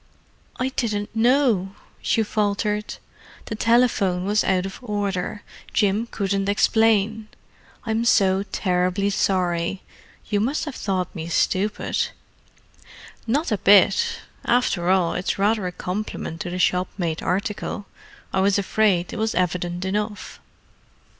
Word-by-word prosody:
"I 255 +1 0
didn't 215 -4 -2
know," 225 -5 +2 0.3
she 225 - +1
faltered. 210 0 -1 0.5
"The - - -5
telephone 220 -5 +2
was 210 +2 +2
out 185 -1 +1
of 195 - -7
order—Jim 205 0 -2
couldn't 195 -2 -1
explain. 220 0 +2 0.6
I'm 225 0 0
so 195 -4 +4
terribly 185 +1 0
sorry—you 185 +2 -2
must 265 +10 0
have 295 - -5
thought 190 -6 -2
me 165 -3 -6
stupid." 195 +5 0 1.2
"Not 285 +7 0
a 210 - +1
bit—after 240 - +2
all, 185 -3 +3
it's 180 - -2
rather 205 0 +1
a - - -3
compliment 180 -3 -5
to 175 - -4
the 180 - -4
shop 180 0 +2
made 165 -4 -2
article. 200 +2 -2 0.5
I 190 - +2
was 195 +1 +3
afraid 200 -3 +1
it - - -5
was 220 0 0
evident 180 0 -1
enough." 210 +2 -3
200 Hz, 120 wpm, -23 LUFS, 185-220 Hz, 1.2 s, so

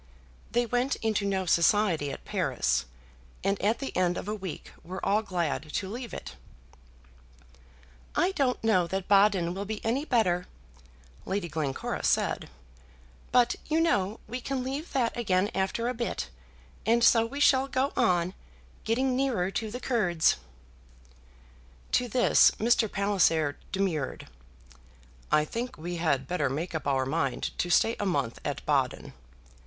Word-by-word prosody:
They 240 0 +2
went 245 +4 0
into 215 -2 +1
no 190 -1 0
society 170 -3 +3
at - - -9
Paris, - - 0 0.6
and 195 +1 0
at 215 +4 +2
the 275 - -6
end 180 -1 +1
of - - -5
a 210 - -1
week 190 -6 -7
were 185 +2 -6
all 205 +2 +3
glad 170 -7 -2
to 190 - -1
leave 240 +1 -6
it. 60 - -8 1.8
"I 370 - +3
don't 270 - 0
know 185 -6 +3
that 190 +1 -3
Baden 195 -4 +4
will 195 +2 -4
be 215 +1 -4
any 245 +6 +1
better," 185 - +1 0.8
Lady 190 -2 -2
Glencora 150 -4 -3
said; - - +1 0.8
"but, 245 0 +4
you 315 +1 +2
know, 215 - +1
we 250 +1 -5
can 265 0 -2
leave 275 +6 -4
that 245 -4 +1
again 200 -3 +1
after 195 +5 -1
a 250 - 0
bit, 235 0 -3 0.5
and 235 +1 +3
so 230 -1 +6
we 265 +5 -5
shall 270 -2 +4
go 275 +1 0
on 180 -6 +2 0.5
getting 255 +3 +1
nearer 240 -9 0
to 215 +3 -3
the 245 +4 -5
Kurds." 185 -11 +2 1.5
To 250 - +2
this, 245 +2 +5
Mr. 225 -1 +2
Palliser 165 -7 +2 0.2
demurred. 185 -8 -2 1.1
"I 150 0 +4
think 235 +9 -5
we 175 +2 -5
had 140 -6 0
better 175 -6 0
make 160 +7 -3
up 160 - -3
our 135 -1 +1
mind 135 -2 -2
to 175 - 0
stay 225 +6 +3
a 205 - -1
month 140 -10 -1
at - - -4
Baden." - - 0
200 Hz, 150 wpm, -28 LUFS, 175-240 Hz, 1.8 s, so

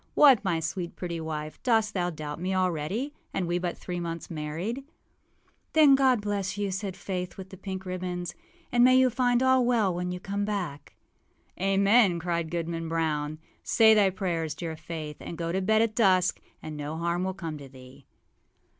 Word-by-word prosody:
What, 270 -8 +7
my 170 -4 +1
sweet, 165 +2 -4
pretty 170 -2 -4
wife, 155 -1 -5
dost 225 -4 +2
thou 180 -2 0
doubt 155 -1 -6
me 190 +1 -1
already, 185 - -1 0.2
and 185 - 0
we 175 +1 0
but 175 -1 -3
three 175 -1 -5
months 170 -1 -5
married?â 165 - -4 1.0
âThen 295 -3 +8
God 260 -4 +3
bless 205 -1 -2
you!â 200 -2 -1
said 190 -1 -4
Faith, 180 -2 -4
with 190 -1 -9
the - - -8
pink 190 0 -6
ribbons; 180 -1 -4 0.4
âand 240 - +4
may 255 +1 +7
you 260 -1 +5
find 245 0 +2
all 260 -1 +4
well 230 -6 +2
when 180 +1 -3
you 180 - -4
come 200 +2 -3
back.â 185 - -5
âAmen!â 200 -3 +5
cried 170 -1 -2
Goodman 165 -1 -3
Brown. 155 -2 -1 0.3
âSay 220 -1 +6
thy 205 -3 +5
prayers, 170 -5 -2
dear 165 0 -5
Faith, 155 -1 -7
and 170 - -7
go 165 0 -2
to 190 +2 0
bed 220 +3 +3
at 225 -1 -1
dusk, 185 -5 +3 0.2
and 155 -1 -6
no 150 +2 -5
harm 170 +2 -1
will 190 0 -2
come 165 -4 -5
to 140 -1 -10
thee. 130 0 -15
180 Hz, 185 wpm, -28 LUFS, 165-205 Hz, 1.0 s, âThen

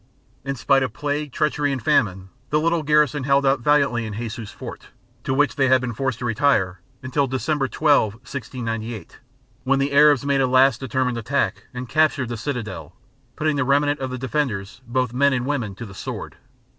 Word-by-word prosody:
In 135 +1 -3
spite 135 +2 +2
of 130 -4 -2
plague, 145 +1 -3
treachery 145 +1 0
and 135 - -2
famine, 95 -4 +1 0.2
the 150 - +2
little 165 +1 +1
garrison 150 -2 +2
held 140 +1 +2
out 135 0 +3
valiantly 140 -2 +2
in 105 - -6
Jesus 115 -1 -5
Fort, - - -9 0.4
to - - -2
which 135 -2 +2
they 135 -2 +3
had 130 0 +5
been 125 -2 -4
forced 130 +1 -2
to 120 - -5
retire, 110 -7 +1 0.2
until 135 +2 0
December 135 +2 -1
12, 140 -9 +2
1698, 115 -2 -6 0.4
when 135 +1 +2
the 140 +1 0
Arabs 145 -1 +5
made 140 -1 +2
a 130 - +3
last 130 -1 +4
determined 130 -1 -1
attack 140 +5 -1
and 125 0 -6
captured 155 -3 +2
the 120 - -3
citadel, 120 -2 -5 0.4
putting 155 -1 0
the 140 - +2
remnant 145 +2 +2
of 130 -1 -3
the 130 - -4
defenders, 125 -5 -3
both 125 0 -1
men 140 +2 +3
and 125 -1 -1
women, 125 -8 -2
to 115 - -7
the 95 - -11
sword. - - -6
130 Hz, 190 wpm, -22 LUFS, 120-145 Hz, 0.4 s, had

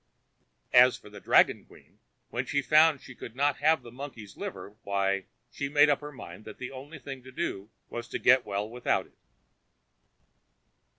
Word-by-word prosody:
As 125 0 +7
for 105 - -15
the 105 - -10
dragon - - +4
queen, - - -20 0.3
when 125 +2 -2
she 145 -1 0
found 155 -1 +5
she 130 - -11
could 120 - -10
not 140 +1 +1
have 160 +2 +3
the 120 - -11
monkey's 120 -6 -9
liver, 100 - -7
why, 100 -1 0 0.3
she 140 - -4
made 145 +1 +5
up 145 - +2
her 150 0 -7
mind 100 -7 -10
that 110 - -10
the 125 - -6
I - - -12
only 140 +4 -9
thing 135 -2 -8
to 130 +1 -13
do 100 -4 -4 0.2
was 120 0 -6
to - - -3
get 130 0 +5
well 100 +1 -3
without 120 +2 -1
it. - - -27
130 Hz, 185 wpm, -29 LUFS, 105-145 Hz, 0.3 s, As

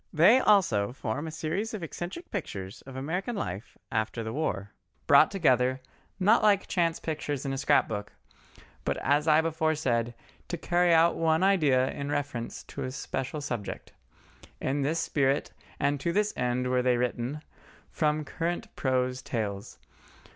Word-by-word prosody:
They 180 +11 +6
also 125 - +3
form 130 +4 -3
a - - -5
series 175 +8 -3
of 195 - -6
eccentric 175 - -6
pictures 100 - -5
of 135 - -9
American 180 - -3
life 100 - -5
after 110 +1 -1
the 110 0 -4
war, 105 -10 -2 0.3
brought - - +7
together, 130 -8 +2 0.4
not 210 +5 +5
like 205 -2 +4
chance 170 -3 0
pictures 150 -3 -3
in 135 - -1
a - - -2
scrap 145 +1 +3
book, 105 -1 -5 0.7
but - - -1
as 145 +3 +1
I 155 0 +6
before 160 -1 0
said, 120 -5 0 0.3
to 175 - -3
carry 175 +1 +2
out 165 +1 +5
one 160 +1 +2
idea 150 -10 +3
in 140 0 -5
reference 140 -5 -3
to - - -8
a 130 - -3
special 130 +2 -4
subject. 120 -8 -5 0.7
In 140 +2 -1
this 155 +4 0
spirit 140 -2 +1 0.3
and 140 0 +1
to 170 +5 -1
this 210 +3 +1
end 125 0 0
were 125 0 +3
they 125 -1 +2
written, 125 +4 -2 0.5
from 150 -1 0
current 175 +2 -3
prose 130 -1 0
tales. 105 -6 -4
145 Hz, 160 wpm, -28 LUFS, 125-165 Hz, 0.7 s, brought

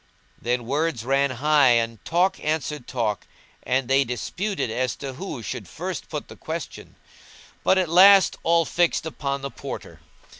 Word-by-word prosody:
Then 120 0 -1
words 145 -2 -1
ran 135 +2 +2
high 140 0 +4
and 115 -2 -1
talk 185 +3 +1
answered 150 -3 -2
talk, 110 -5 -2 0.3
and 130 0 0
they 135 +2 +4
disputed 135 - -3
as 125 +1 -1
to 135 -2 -6
who 135 -5 -6
should - - -5
first - - -6
put - - -5
the - - -11
question, - - -7 0.7
but 190 - +4
at 185 -2 +2
last 190 +4 +7
all 170 0 +3
fixed 170 +1 +1
upon 140 -3 -3
the 140 0 -5
Porter. - - -8
140 Hz, 155 wpm, -24 LUFS, 125-165 Hz, 0.7 s, last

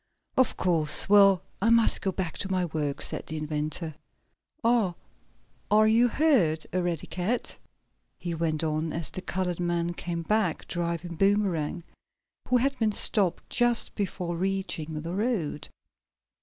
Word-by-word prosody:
"Of 260 -3 +2
course. 165 -4 +4
Well, 195 -3 +6 0.2
I 225 - +3
must 230 -1 +4
get 190 -2 -2
back 180 -4 -3
to 195 - -1
my 185 -1 +1
work," 150 -4 -1
said - - -3
the 155 - -5
inventor. 155 +1 -2 0.7
"Ah, 225 -6 +2 0.7
are 215 +1 +5
you 230 +3 +4
hurt, 235 - +2
Eradicate?" 180 +5 -2 0.6
he 175 -1 -4
went 160 -1 -1
on, 155 0 -1
as 165 -3 -4
the 185 - -3
colored 180 -1 -3
man 175 0 -1
came 170 -1 -4
back, 210 -3 0
driving 170 0 -3
Boomerang, 195 -5 +1 0.6
who 250 - +3
had 275 +2 0
been 220 -2 +2
stopped 195 -4 +1
just 240 -1 +1
before 180 -4 -3
reaching 175 -5 -3
the 170 +2 -5
road. 190 - -2
180 Hz, 140 wpm, -27 LUFS, 165-205 Hz, 0.7 s, Well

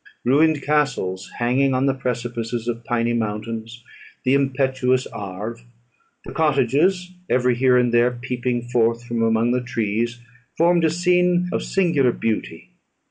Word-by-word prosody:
Ruined 145 +3 +3
castles 135 -11 -1
hanging 130 +3 +1
on 130 +1 +1
the 135 - +2
precipices 120 -2 -4
of 120 -1 -3
piny 120 0 0
mountains; 115 +1 -4 0.4
the 130 - +2
impetuous 130 -2 +1
Arve, 105 +4 -7 0.6
and - - -8
cottages 160 +5 +1 0.2
every 125 0 +2
here 125 +1 +3
and 125 -1 +2
there 120 +1 +4
peeping 125 0 -3
forth 120 -1 +1
from 120 -1 -3
among 115 +1 +2
the 125 0 +1
trees, 120 0 -2 0.4
formed 170 0 +3
a - - +4
scene 180 +1 +2
of - - 0
singular 165 -10 +2
beauty. 80 - -4
125 Hz, 135 wpm, -22 LUFS, 115-140 Hz, 0.6 s, there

